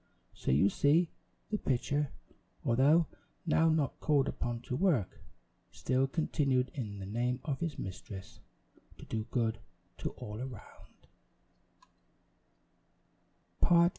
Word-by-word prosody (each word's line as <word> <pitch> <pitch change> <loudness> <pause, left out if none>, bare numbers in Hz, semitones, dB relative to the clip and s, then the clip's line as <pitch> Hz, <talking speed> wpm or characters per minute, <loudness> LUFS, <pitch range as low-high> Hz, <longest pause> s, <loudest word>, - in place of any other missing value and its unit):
So - - -4
you 70 +9 +5
see 160 +4 +3 0.4
the 210 - 0
pitcher, 140 +3 0 0.5
although 140 +8 +5 0.4
now 165 0 +4
not 155 -4 +1
called 145 -3 +3
upon 120 -1 -2
to 125 - -3
work, 155 - +1 0.5
still 130 +1 +1
continued, 135 -4 +1
in 105 -7 -4
the 95 - -6
name 120 +5 0
of 140 -4 -1
his 165 -5 -2
mistress, 95 0 -7 0.6
to - - -11
do 110 -1 -3
good 115 -3 0 0.4
to - - -1
all 105 +2 -6
around. 130 -4 -10
130 Hz, 110 wpm, -33 LUFS, 115-150 Hz, 0.6 s, you